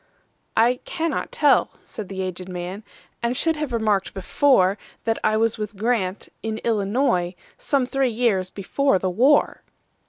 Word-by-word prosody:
"I 240 +3 +4
cannot 330 +3 -2
tell," - - +3
said 210 -4 -8
the 190 -1 -3
aged 185 0 -5
man,"And 195 +6 -6
should 325 -1 +1
have 300 -3 -3
remarked 215 -5 0
before, 195 -1 +3 0.2
That 225 -1 0
I 215 0 +2
was 225 0 +1
with 210 -1 -5
Grant,—in 220 0 -2
Illinois,—Some 215 +2 0
three 270 0 +1
years 220 -6 +1
before 205 +5 +1
the 185 0 -1
war." 265 +10 +3
220 Hz, 130 wpm, -23 LUFS, 190-250 Hz, 0.2 s, I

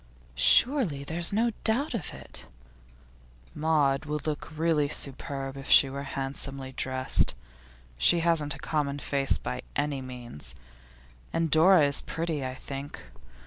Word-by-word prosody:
'Surely 160 - +3
there's 165 +4 +2
no 230 +3 +2
doubt 255 +7 +2
of 200 -10 -4
it.' - - -7 1.1
'Maud 150 -2 +1
would 150 0 -4
look 155 0 -4
really 155 -3 +2
superb 135 -1 -3
if 135 0 -8
she 135 - +7
were 140 +1 -5 0.2
handsomely 135 0 -4
dressed. 130 - 0 0.6
She 170 - +4
hasn't 165 -4 +1
a - - -10
common 145 -2 -1
face, 140 -1 +1
by 125 - -5
any 145 -2 -1
means. 125 - -8 0.8
And 165 -2 0
Dora 165 +1 +6
is 140 -1 +2
pretty, 160 -3 -3
I 130 0 -4
think. 140 +2 -7
145 Hz, 135 wpm, -28 LUFS, 135-165 Hz, 1.1 s, she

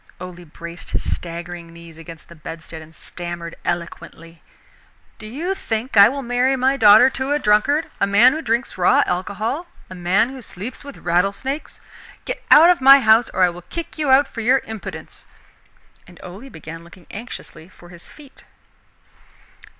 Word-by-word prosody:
Ole 180 -1 -10
braced 170 +2 -10
his - - -2
staggering 170 0 -8
knees 170 -1 -14
against 165 0 -12
the - - -13
bedstead, 160 0 -10
and 160 +1 -16
stammered 175 -1 -7
eloquently: 170 -1 -6 0.8
"Do 215 - -9
you 320 - -3
think 230 - -4
I 200 0 +8
will 275 +2 -5
marry 250 +2 +1
my 265 +1 +1
daughter 220 0 +7
to 270 +2 -2
a - - +2
drunkard? 285 +7 +1
a 200 - +2
man 225 +6 +5
who 315 - -4
drinks 235 -5 -2
raw 180 - +4
alcohol? 210 - -3 0.2
a - - -6
man 185 +6 +1
who 265 -1 -9
sleeps 220 +4 -9
with 280 -1 -11
rattle 180 +3 +1
snakes? 275 +7 -6 0.5
Get - - -5
out 330 +4 +8
of 350 - 0
my 275 +1 +8
house 220 +1 +4
or 185 - 0
I 180 - +5
will 175 0 -9
kick 330 - -8
you 300 -3 0
out 270 +2 +5
for 230 - -7
your 255 +4 +3
impudence." 220 -2 -9 0.8
And 180 -1 -16
Ole 195 +9 -10
began 165 -3 -10
looking 170 +1 -17
anxiously 205 -6 -9
for 175 -2 -17
his 175 -1 -13
feet. 285 -3 -16
205 Hz, 175 wpm, -20 LUFS, 175-265 Hz, 0.8 s, I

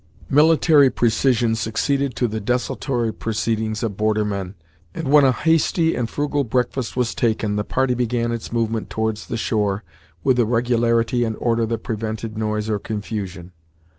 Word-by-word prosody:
Military 150 -1 +5
precision 120 -1 +2
succeeded 125 +5 -1
to 125 - +1
the 110 0 -3
desultory 120 +1 -1
proceedings 110 -1 -2
of 105 -4 -3
border 110 0 +1
men, 100 -2 -4 0.4
and 160 - -4
when 145 +1 +6
a 135 - +5
hasty 165 +3 +2
and 115 -2 -2
frugal 145 -1 -1
breakfast 125 0 -2
was 125 -2 0
taken, 110 -3 0
the 105 - 0
party 130 +3 0
began 120 -1 -1
its 115 -2 -5
movement 115 -1 -1
towards 110 -1 -2
the 115 - -3
shore 105 -2 -1 0.4
with 130 -2 +3
a 120 - +4
regularity 120 0 +1
and 110 -2 -2
order 115 -1 +1
that 115 -1 -3
prevented 110 0 -4
noise 105 0 -2
or 105 -2 0
confusion. 100 -4 -5
115 Hz, 160 wpm, -21 LUFS, 110-125 Hz, 0.4 s, when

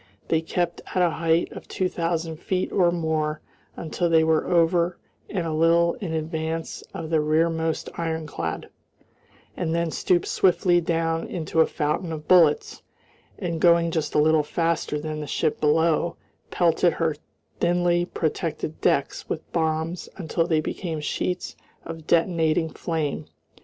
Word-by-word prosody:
They 160 -1 +2
kept 170 +1 -2
at 185 - +3
a 175 - +3
height 165 +1 +1
of - - -10
two 185 - -1
thousand 165 -2 -2
feet 185 +3 -2
or 180 -3 +3
more 160 -2 -1 0.4
until 170 +2 -1
they 160 -1 +5
were 160 0 +2
over 170 0 +2 0.3
and 180 -5 -2
a 160 - -2
little 170 +2 +4
in 185 -5 -3
advance 160 0 -3
of 160 0 -6
the 160 -2 +3
rearmost 160 +1 0
ironclad, 155 - -3 0.9
and 165 -2 -1
then 170 -1 0
stooped 175 +1 +1
swiftly 180 -1 +3
down 165 -1 -1
into 160 -2 0
a - - +4
fountain 155 +3 -2
of 155 -1 -6
bullets, 165 -5 +4 0.6
and 170 -4 -3
going 170 -1 +4
just 155 -2 -2
a - - +5
little 155 +1 +4
faster 165 0 -1
than 155 0 -4
the 150 - -5
ship 150 - -1
below, 160 +2 +2 0.3
pelted 175 0 +2
her 165 -2 0 0.4
thinly 175 0 +2
protected 160 -2 -3
decks 140 - 0
with 160 - -5
bombs 160 +1 -1
until 165 -2 -1
they 160 -3 +2
became 160 0 -4
sheets 180 +4 -3 0.3
of 165 -1 -8
detonating 165 -1 +2
flame. 160 -4 -3
165 Hz, 145 wpm, -24 LUFS, 160-170 Hz, 0.9 s, they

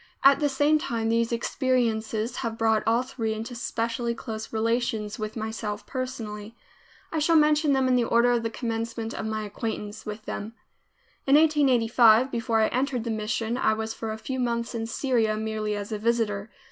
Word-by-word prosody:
At 275 0 +7
the 290 - +2
same 290 +3 +3
time 230 -8 -2
these 230 0 +1
experiences 235 -2 0
have 230 -3 -3
brought 220 -1 +2
all 230 +2 +3
three 230 -4 -3
into 225 +3 -6
specially 235 0 -2
close 220 -2 -6
relations 225 -1 -1
with 215 +1 -4
myself 215 -1 -4
personally. 225 -4 -5 0.6
I 320 - -1
shall 330 +2 +3
mention 300 -1 +4
them 265 -1 +2
in 255 - +3
the 245 -1 +2
order 235 +1 +3
of 240 -1 +2
the 225 - -2
commencement 230 -1 -3
of 220 - -4
my 215 0 -2
acquaintance 210 0 -5
with 215 0 -7
them. 220 +3 -5 0.7
In 275 - +6
1885, 255 -5 +5
before 230 -1 +1
I 220 - +3
entered 255 -1 -1
the 230 - -2
mission, 220 +2 -2
I 220 - +3
was 220 0 -3
for 225 -1 -5
a 215 - -4
few 260 +4 -4
months 235 -1 -1
in 225 -1 -3
Syria, 230 -3 +1
merely 215 -1 -2
as 205 +1 -5
a 215 - -2
visitor. 220 -2 0
230 Hz, 185 wpm, -26 LUFS, 220-250 Hz, 0.7 s, At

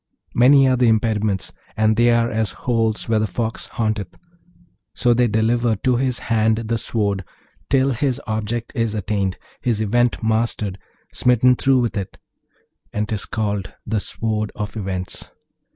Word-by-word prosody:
Many 135 +3 +6
are 130 -1 +3
the 125 -1 +3
impediments, 110 -3 +1 0.2
and 110 0 +3
they 120 +2 +4
are 115 0 +2
as 110 -3 -1
holes 115 -3 0
where 110 -1 +2
the 110 - 0
fox 115 +1 -3
haunteth. 110 -4 -3 0.8
So 120 -2 +3
they 120 +1 +3
deliver 115 +1 +1
to 125 +4 +1
his 125 -1 0
hand 110 -1 +1
the 115 0 -2
sword 100 -4 -1 0.5
till 135 0 +3
his 130 +1 0
object 110 +2 -3
is 115 -4 -1
attained, 100 -2 -1 0.2
his 115 -4 0
Event 120 +3 +1
mastered, 110 -3 0 0.3
smitten 125 +1 +4
through 130 0 +3
with 120 -1 -1
it; 95 -2 -5 0.7
and 105 0 -2
'tis 105 -2 -2
called 105 -3 -2
the 110 - 0
Sword 110 +1 -2
of 105 0 -5
Events. 95 -3 -4
110 Hz, 150 wpm, -21 LUFS, 105-120 Hz, 0.8 s, Many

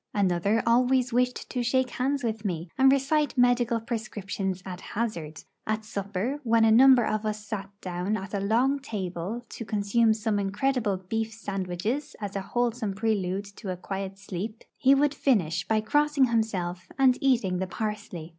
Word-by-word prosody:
Another 200 +2 +2
always 250 +1 +3
wished 250 +1 0
to 250 - -1
shake 255 +1 +1
hands 275 +2 -1
with 220 -2 -2
me, 175 -4 -3
and 265 0 +6
recite 280 +2 +1
medical 245 -1 +3
prescriptions 205 -5 -4
at 185 -1 -7
hazard; 170 -10 -4 0.2
at 215 0 -1
supper, 205 +6 -3
when 230 -2 +4
a 220 - +5
number 255 0 +7
of 215 0 -1
us 215 -1 -3
sate 205 -3 -4
down 180 +4 -2
at 195 +1 -8
a 200 - 0
long 240 +8 +2
table 205 -1 -4
to - - -7
consume 220 +1 +2
some 215 -1 0
incredible 205 +1 0
beef 220 +4 -3
sandwiches 200 - -3
as 205 -2 -5
a 195 - -1
wholesome 230 -1 -1
prelude 200 -2 -1
to 200 -2 -6
quiet 195 +1 -5
sleep, 200 +3 -6
he 275 0 +5
would 290 +1 +2
finish 180 - +1
by 220 -1 +2
crossing 295 +5 +3
himself 190 -7 -1
and 260 -2 +4
eating 230 -9 +2
the 190 - -2
parsley. 205 -5 -5
215 Hz, 165 wpm, -27 LUFS, 195-245 Hz, 0.2 s, number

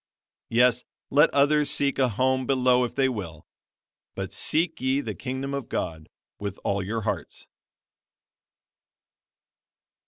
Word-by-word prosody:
Yes, 125 +1 +4 0.3
let 150 +3 +6
others 145 +1 +3
seek 140 -1 +1
a 130 -2 +3
home 130 +3 +1
below 125 -2 +3
if 120 - -4
they 135 -1 +3
will, 95 -11 -5 0.7
but 95 0 -5
seek 160 - 0
ye 130 +1 +2
the - - -4
Kingdom 135 +1 -4
of 140 -4 -4
God 80 -1 -4 0.3
with 100 -1 -4
all 100 0 0
your 110 +4 -3
hearts. - - -4
130 Hz, 125 wpm, -26 LUFS, 105-140 Hz, 0.7 s, let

